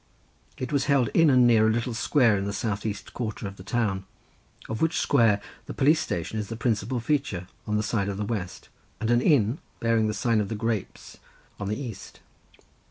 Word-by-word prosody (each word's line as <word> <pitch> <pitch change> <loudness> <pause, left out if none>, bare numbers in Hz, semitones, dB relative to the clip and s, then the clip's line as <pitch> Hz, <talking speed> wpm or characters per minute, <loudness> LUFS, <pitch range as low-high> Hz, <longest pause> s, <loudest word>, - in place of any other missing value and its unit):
It 130 +2 -4
was 140 - +2
held 135 -5 +3
in 165 -2 +4
and 125 -2 +5
near 110 -2 +5
a - - +4
little 120 +2 -1
square 115 +1 +3
in 100 0 -2
the 100 - -3
south 105 0 -2
east 105 -2 -6
quarter 110 -3 -4
of 100 0 -9
the 95 - -10
town, 100 -3 -1 0.6
of 110 - -4
which 160 0 +2
square 115 -7 +3 0.3
the - - -6
police 150 +4 +4
station 85 +6 -3
is 105 - -4
the 115 - -5
principal 115 +1 -1
feature 115 -9 -1 0.2
on 105 0 +1
the 105 - 0
side 100 -2 -1
of 100 - -4
the 105 - -2
west, 100 -5 -5 0.3
and 110 +1 0
an 120 0 +4
inn, 130 - +3 0.2
bearing 115 -1 +2
the 105 - -2
sign 115 -3 +2
of 100 - -3
the 110 - -3
Grapes, 110 -2 -4 0.4
on 100 - -3
the 105 - -2
east. 115 -8 -8
110 Hz, 210 wpm, -26 LUFS, 105-125 Hz, 0.6 s, and